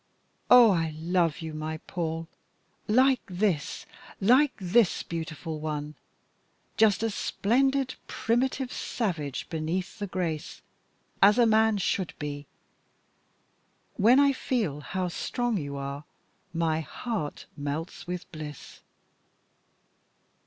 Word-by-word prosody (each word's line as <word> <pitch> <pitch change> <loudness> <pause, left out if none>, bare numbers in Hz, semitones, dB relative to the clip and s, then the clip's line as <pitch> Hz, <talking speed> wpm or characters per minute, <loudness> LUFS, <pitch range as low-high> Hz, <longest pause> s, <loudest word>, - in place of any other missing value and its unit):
"Oh! 245 -3 +9
I 165 -4 0
love 170 -1 +1
you, 160 -1 -5
my 155 +1 -4
Paul 165 -2 -3 0.6
like 255 +3 +4
this, 180 -5 -1 0.3
like 255 +8 +5
this! 195 +2 +2
Beautiful 160 -1 -5
one! 150 -1 -4 0.8
Just 220 -1 +4
a 225 - +1
splendid 265 +6 +1
primitive 255 +2 0
savage 165 - -3
beneath 170 +6 -3
the 205 - -3
grace, 170 -5 -4 0.6
as 205 +4 +7
a 240 - +6
man 220 -1 +4
should 190 -2 -1
be. 145 -1 -5 1.5
When 235 +7 +5
I 280 -1 +5
feel 220 - -1
how 185 +5 -3
strong 240 +6 -1
you 140 -2 -5
are 140 +1 -5 0.5
my 165 -2 0
heart 160 - -4
melts 145 +5 -5
with 180 0 -4
bliss!" 150 -2 -9
180 Hz, 110 wpm, -28 LUFS, 155-225 Hz, 1.5 s, Oh